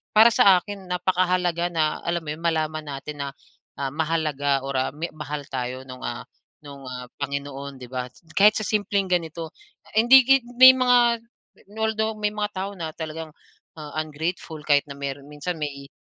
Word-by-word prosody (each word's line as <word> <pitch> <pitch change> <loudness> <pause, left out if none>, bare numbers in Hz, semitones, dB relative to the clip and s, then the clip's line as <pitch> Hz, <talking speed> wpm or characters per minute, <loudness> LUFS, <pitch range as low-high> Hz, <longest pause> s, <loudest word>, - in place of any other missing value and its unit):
para 225 +2 +8
sa 195 -4 +6
akin 195 0 -9
napakahalaga 180 -1 +1
na 160 -3 0
alam 170 -1 0
mo 150 - -4
'yon 155 - -6
malaman 155 -2 -1
natin 145 +1 -7
na, 140 - -2 0.5
ah, 135 -1 -3
mahalaga 150 -3 0
or, 135 -1 -1
ah, 130 - -1
mi 165 +3 -4
mahal 150 -1 -5
tayo 130 0 -4
no'ng, 125 -1 -10
ah, 120 - -5 0.4
no'ng, 140 -1 -11
ah, 125 0 -6
Panginoon, 140 0 -4
'di 125 - -11
ba? 125 -1 -3 0.2
Kahit 205 +5 +5
sa 215 - -1
simpleng 200 -3 0
ganito 165 -2 -1 0.4
hindi 245 +4 +7
git 270 -2 +3
may 255 +1 +11
mga 245 -2 +4 0.6
although 220 0 0
may 210 -1 -1
mga 210 0 -2
tao 195 +2 -3
na 160 -1 -5
talagang, 160 0 -6 0.5
ah, 150 -1 -8
ungrateful 160 +1 -5
kahit 145 -1 +4
na 140 - -8
mayroon 140 0 -5
minsan 150 +4 -4
may 140 -2 -5
160 Hz, 170 wpm, -24 LUFS, 140-195 Hz, 0.6 s, may